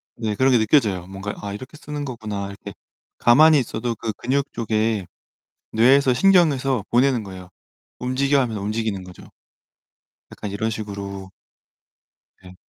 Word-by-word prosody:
네 110 -2 -3
그런 130 +4 +3
게 125 - +5
느껴져요. 110 - +2
뭔가 95 +2 -6
'아 100 -1 -5
이렇게 130 +8 -9
쓰는 150 -2 -6
거구나.' 110 -6 -5
이렇게 100 0 -9 0.5
가만히 150 +5 +6
있어도 120 -1 -3
그 110 0 -4
근육 135 +6 -2
쪽에 110 -3 -1 0.7
뇌에서 130 +4 +4
신경에서 135 - +3
보내는 125 -1 +3
거예요. 95 -2 -10 0.5
"움직여." 135 +3 +1
하면서 115 -6 -2
움직이는 105 -2 -2
거죠. 90 -1 -13 1.1
약간 105 - -6
이런 110 +3 -2
식으로 100 -3 -6 1.1
네. 90 0 -13
115 Hz, 310 characters per minute, -22 LUFS, 100-130 Hz, 1.1 s, 가만히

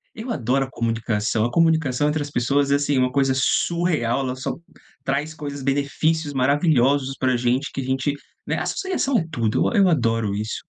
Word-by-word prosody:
Eu 235 +2 -5
adoro 130 - 0
a - - -12
comunicação. 115 -2 -1
A 120 - -2
comunicação 160 -4 +2
entre 150 0 0
as 145 0 -5
pessoas 140 +3 +1
é, - - +5
assim, 145 -1 +1
uma 125 0 +2
coisa 135 0 +2
surreal, 150 -2 +1
ela 130 -1 -2
só 130 - -4 0.5
traz 145 +3 -2
coisas 145 -2 -6
benefícios 145 +3 0
maravilhosos 135 -1 +2
pra 130 -1 +1
gente, 125 +3 0
que 135 - -3
a - - -4
gente, 130 +2 -1 0.3
né, - - -1
associação 320 -9 -1
é 165 - -3
tudo. 115 - 0
E - - +3
eu 195 -2 +5
adoro 115 - +1
isso. 105 +2 -4
135 Hz, 185 wpm, -22 LUFS, 125-150 Hz, 0.5 s, é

